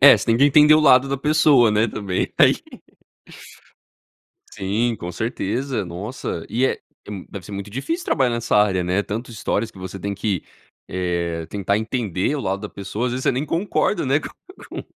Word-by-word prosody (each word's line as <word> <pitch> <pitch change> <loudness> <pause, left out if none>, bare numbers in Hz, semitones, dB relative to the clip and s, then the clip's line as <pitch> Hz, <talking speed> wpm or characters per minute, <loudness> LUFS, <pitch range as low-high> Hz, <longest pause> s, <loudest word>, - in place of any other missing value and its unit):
É, 140 - +9
você - - -5
tem 115 -1 +3
que 135 - +5
entender 150 +1 +7
o 155 - +5
lado 135 -3 +5
da 140 - -1
pessoa, 145 -4 +4
né, 105 +2 +3
também 100 -4 -2
aí. - - +7 2.0
Sim, 110 +5 -1
com 90 -2 -6
certeza, 115 +4 -2
nossa, 90 0 -5
e 125 +3 0
é - - -2 0.3
é - - -9
m 95 -3 -7
deve 95 -3 -8
ser 105 - -10
muito 100 +1 -5
difícil 325 - -3
trabalhar 130 -2 +2
nessa 115 -2 0
área, 100 -3 +3
né, 90 +3 0
tanto 115 +5 -5
histórias 110 -1 -2
que 95 - -16
você 95 +1 -7
tem 100 +2 -3
que, 100 -3 -2 0.5
eh, 85 -2 -2
tentar 100 0 0
entender 110 - -1
o 145 - -2
lado 95 -3 -2
da 105 - -5
pessoa, 100 +5 -4
às 120 - -2
vezes 130 +1 -3
você - - +3
nem 130 +4 -1
concorda, 175 0 0
né, 140 +3 +2
com - - -6 0.4
com - - -7
110 Hz, 195 wpm, -22 LUFS, 95-130 Hz, 2.0 s, É